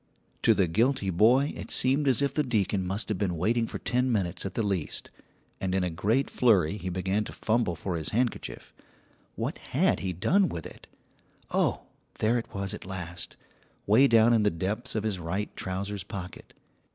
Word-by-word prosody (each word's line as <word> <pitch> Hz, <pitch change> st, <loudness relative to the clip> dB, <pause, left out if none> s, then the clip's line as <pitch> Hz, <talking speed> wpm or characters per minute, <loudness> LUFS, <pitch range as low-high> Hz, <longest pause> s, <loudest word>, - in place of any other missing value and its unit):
To 115 Hz, -, +5 dB
the 95 Hz, -2 st, +3 dB
guilty 110 Hz, +3 st, +1 dB
boy 120 Hz, -, +4 dB
it -, -, -7 dB
seemed 135 Hz, +3 st, +3 dB
as 130 Hz, 0 st, +3 dB
if 140 Hz, -1 st, 0 dB
the 150 Hz, -, +2 dB
deacon 105 Hz, -7 st, 0 dB
must 100 Hz, +2 st, -2 dB
have 105 Hz, -4 st, -1 dB
been 90 Hz, -4 st, -1 dB
waiting 115 Hz, +7 st, +1 dB
for -, -, -5 dB
ten 125 Hz, +1 st, 0 dB
minutes 95 Hz, -4 st, -1 dB
at -, -, -9 dB
the 115 Hz, -, 0 dB
least, 95 Hz, -6 st, -3 dB, 0.5 s
and 95 Hz, -1 st, -1 dB
in 95 Hz, -, +1 dB
a 90 Hz, -, -1 dB
great 110 Hz, +11 st, +1 dB
flurry 100 Hz, -7 st, +3 dB
he 95 Hz, -2 st, -4 dB
began 95 Hz, +3 st, 0 dB
to -, -, -7 dB
fumble 110 Hz, -6 st, 0 dB
for 85 Hz, +3 st, -4 dB
his 80 Hz, -2 st, -4 dB
handkerchief. 120 Hz, +2 st, -2 dB, 0.6 s
What -, -, -3 dB
had -, -, +1 dB
he 95 Hz, -, -2 dB
done 180 Hz, -, +2 dB
with 80 Hz, -, -5 dB
it? -, -, -11 dB, 0.6 s
Oh, -, -, +1 dB, 0.3 s
there 115 Hz, +3 st, +2 dB
it 115 Hz, -, -9 dB
was 100 Hz, -1 st, -3 dB
at -, -, -7 dB
last, 90 Hz, -2 st, -7 dB, 0.5 s
way 115 Hz, +7 st, +6 dB
down 115 Hz, 0 st, +5 dB
in 115 Hz, -, +4 dB
the 105 Hz, -, +3 dB
depths 105 Hz, +8 st, -3 dB
of 110 Hz, -, 0 dB
his 105 Hz, -4 st, -2 dB
right 95 Hz, +5 st, -3 dB
trousers' 95 Hz, +1 st, -4 dB
pocket. 95 Hz, -2 st, -8 dB
100 Hz, 190 wpm, -28 LUFS, 95-115 Hz, 0.6 s, way